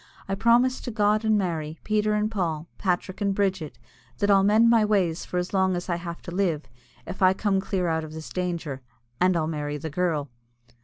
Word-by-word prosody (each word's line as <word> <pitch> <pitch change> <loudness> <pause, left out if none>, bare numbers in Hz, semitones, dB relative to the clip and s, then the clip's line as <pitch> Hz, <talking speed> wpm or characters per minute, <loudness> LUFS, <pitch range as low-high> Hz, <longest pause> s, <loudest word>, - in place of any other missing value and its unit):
I 195 - -2
promise 235 +5 +3
to - - -5
God 210 -1 +2
and 220 -1 +3
Mary, 165 -5 -2
Peter 215 0 +1
and 210 +1 0
Paul, 165 -6 -2
Patrick 185 +1 -1
and 200 -1 +1
Bridget, 190 -6 -1 0.4
that 205 0 +2
I'll 195 -1 +6
mend 215 +3 +5
my 230 -2 +5
ways 190 -6 +1
for 180 - -4
as 180 +2 -2
long 190 -1 +2
as 175 +1 -5
I 175 - 0
have 170 0 -7
to 175 - -7
live, 175 -6 0 0.4
if 185 +3 -8
I 185 0 +6
come 195 -1 0
clear 190 -2 -1
out 160 -1 0
of 155 0 -8
this 160 0 -8
danger 170 -7 -3 0.4
and 180 0 +3
I'll 160 - 0
marry 150 -2 -3
the 160 +1 -6
girl." 155 -5 -1
185 Hz, 210 wpm, -25 LUFS, 165-205 Hz, 0.4 s, I'll